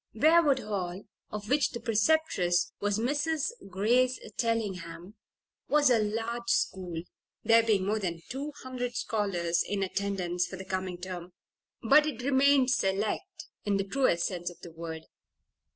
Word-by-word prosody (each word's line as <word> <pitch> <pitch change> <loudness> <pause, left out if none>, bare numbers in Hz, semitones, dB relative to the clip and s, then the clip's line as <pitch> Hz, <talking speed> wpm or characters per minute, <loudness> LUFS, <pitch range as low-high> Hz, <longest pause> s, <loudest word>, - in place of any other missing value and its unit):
Briarwood 310 +2 +5
Hall, 190 -3 -4 0.3
of 210 0 -6
which 280 +3 +3
the 235 - -6
preceptress 225 - +2
was 205 0 0
Mrs. 295 - 0 0.2
Grace 245 +7 +2 0.2
Tellingham, 190 -6 -2 0.6
was 290 -3 +4
a 235 - +5
large 225 +3 -2
school 180 -6 0 0.4
(there 230 +1 +6
being 215 -4 +1
more 215 +2 0
than 170 -4 -4
two 280 +4 -4
hundred 250 -2 -4
scholars 180 -6 0
in 200 -1 -1
attendance 185 -2 -1
for - - -7
the 190 +1 -8
coming 185 -1 -3
term), 180 -1 -7 0.5
but 295 +6 +6
it 250 -5 -4
remained 270 -1 +4
"select" 215 - -1 0.2
in 205 -2 +1
the 195 - 0
truest 195 -5 +1
sense 175 -2 -3
of 175 - -14
the 170 - -10
word. 160 -1 -7
210 Hz, 145 wpm, -29 LUFS, 185-255 Hz, 0.6 s, there